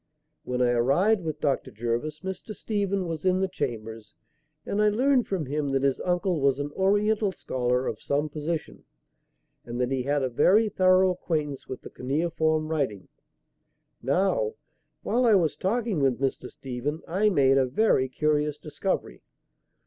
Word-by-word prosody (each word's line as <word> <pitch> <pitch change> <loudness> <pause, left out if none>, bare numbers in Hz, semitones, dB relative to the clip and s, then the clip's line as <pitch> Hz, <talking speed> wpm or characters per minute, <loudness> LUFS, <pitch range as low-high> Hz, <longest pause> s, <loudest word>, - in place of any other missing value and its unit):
When 125 0 0
I 120 - +3
arrived 170 - +2
with 155 -2 -4
Dr. 140 -3 0
Jervis, 120 +7 -3
Mr. 190 +3 -6
Stephen 200 -2 -1
was 160 -2 -4
in 185 0 +2
the 190 - +1
chambers, 115 - -5 0.5
and 205 - -1
I 210 - +5
learned 255 +4 +2
from 185 -6 -2
him 145 +1 -2
that 135 0 +1
his 135 -1 +1
uncle 180 -2 0
was 135 -1 +3
an 145 0 -4
Oriental 205 +3 +2
scholar 125 -6 -1
of 110 - -4
some 145 +2 0
position 155 +2 -4 0.8
and 120 +1 -6
that 125 +1 0
he 135 -1 0
had 140 +2 0
a - - +1
very 210 - +4
thorough 185 -1 +4
acquaintance 150 -6 -3
with 130 - -7
the - - -10
cuneiform 155 +3 0
writing. 135 - -2 0.9
Now, 195 - +1 0.5
while 250 +2 +1
I 225 -4 +5
was 165 -6 +2
talking 210 +2 -1
with 135 -3 +1
Mr. 135 -2 -2
Stephen 135 +4 -5
I 200 +5 +2
made 135 -7 +4
a 130 - +2
very 130 - +2
curious 150 +1 0
discovery. 155 +5 -3
155 Hz, 160 wpm, -26 LUFS, 135-190 Hz, 0.9 s, I